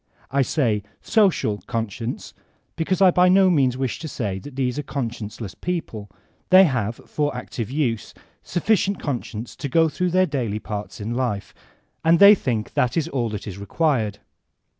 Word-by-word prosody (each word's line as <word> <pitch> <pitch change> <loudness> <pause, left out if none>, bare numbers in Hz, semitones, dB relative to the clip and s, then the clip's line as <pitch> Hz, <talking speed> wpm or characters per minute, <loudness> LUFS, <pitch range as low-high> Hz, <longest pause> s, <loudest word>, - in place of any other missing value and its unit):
I 140 +1 +2
say 120 -6 +1 0.2
''social'* 140 - +2
conscience, 115 +1 -4 0.4
because 180 +3 +1
I 185 - +7
by 180 +1 +4
no 190 0 +5
means 130 -6 +2
wish 130 -6 -2
to 160 - -6
say 100 -9 -3
that 140 +5 -11
these 130 0 -1
are - - 0
conscienceless 115 -7 -5
people; 140 - -4 0.4
they 185 +1 +9
have, 120 - 0
for 145 -1 -2
active 120 -2 -5
use, 125 -6 -2 0.3
sufficient 200 +2 0
conscience 120 -4 -5
to 140 - -4
go 165 +2 +4
through 180 +5 -1
their 185 +2 +3
daily 125 - -2
parts 105 -1 -6
in 110 +3 -3
life, 120 -5 -2 0.5
and 165 +1 +5
they 200 +3 +9
think 120 - -2
that 125 +3 +1
is 160 - 0
all 120 -4 -1
that 105 -2 -6
is 100 -2 -7
required. 110 -2 0
130 Hz, 165 wpm, -23 LUFS, 110-165 Hz, 0.5 s, they